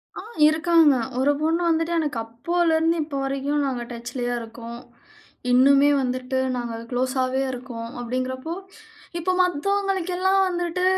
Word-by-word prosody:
ஆ - - -6 0.3
இருக்காங்க. 320 -2 +4 0.2
ஒரு 280 +2 +3
பொண்ணு 325 +3 +1
வந்துட்டு 330 +1 +1
எனக்கு 295 -6 -2
அப்போலேருந்து 325 +7 +1
இப்ப 300 -1 -7
வரைக்கும் 275 +2 -1
நாங்க 250 -2 -3
டச்லயே 245 +1 -4
இருக்கோம். 230 +1 -9 0.7
இன்னுமே 275 +3 +6
வந்துட்டு 255 0 -2 0.2
நாங்க 240 -2 -4 0.2
குளோஸாவே 255 +1 0
இருக்கோம் 240 -2 -7
அப்டிங்கறபோ, 255 +5 -3 0.7
இப்ப 370 +2 0
மத்தவர்களுக்கு 380 +2 0
எல்லாம் 380 +1 +3
வந்துட்டு. 350 0 -2
275 Hz, 120 wpm, -23 LUFS, 250-335 Hz, 0.7 s, இன்னுமே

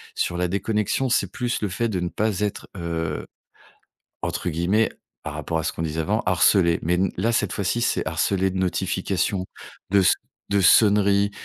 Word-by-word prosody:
Sur 85 - -1
la 90 0 +1
déconnexion, 105 +6 0
c'est 100 -6 +1
plus 120 -2 -2
le 105 - 0
fait 110 +5 -1
de 95 -4 -2
ne 90 0 -2
pas 105 -2 -1
être, 105 -1 -3
heu, 80 -3 -3 1.0
entre 90 - -2
guillemets, 90 +7 +1 0.3
par 75 -1 -5
rapport 75 +2 -2
à 80 - -2
ce - - -1
qu'on 80 - -5
disait 80 0 -2
avant, 105 +8 0
«harcelé», 90 -1 +4
mais 90 +2 +1 0.2
là 115 +6 +1
cette - - 0
fois-ci 105 +3 -1
c'est 120 - 0
harcelé 95 +4 +1
de 95 - -4
notifications, 95 0 -1 0.5
de 100 0 +5
s 95 - +5 0.4
de 100 0 +2
sonneries, 100 +1 +5
95 Hz, 180 wpm, -23 LUFS, 85-105 Hz, 1.0 s, de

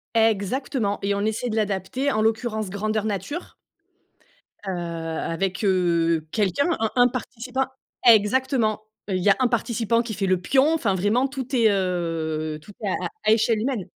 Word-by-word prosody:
Exactement! 225 +1 +1
Et 200 0 +1
on 200 - -2
essaie 220 +3 -1
de 215 - -2
l'adapter, 215 +6 -1
en 215 -3 +1
l'occurrence 220 -2 0
grandeur 215 +2 -2
nature 215 - -4 1.1
heu, - - 0 0.6
avec, 185 +3 -2
heu, 170 -4 +2
quelqu'un, 215 - +1
un 225 -1 0
un 245 -1 +6
participant 255 +1 -3 0.4
exactement. 230 0 +4 0.3
Heu, 190 - 0
il 185 - -1
y 205 - +4
a 200 - +6
un 255 - +4
participant 230 -1 0
qui 230 - -5
fait 195 -1 -1
le 185 -1 +2
pion, 270 - +3
enfin, 230 -12 +1
vraiment, 205 +8 +1
tout 265 -1 -5
est, 230 -3 +5
heu, 165 -5 -2
tout 205 - -13
est - - -1
à 185 -2 -1 0.2
à 215 - +4
échelle 220 0 +3
humaine. 230 -4 -2
215 Hz, 165 wpm, -24 LUFS, 190-245 Hz, 1.1 s, un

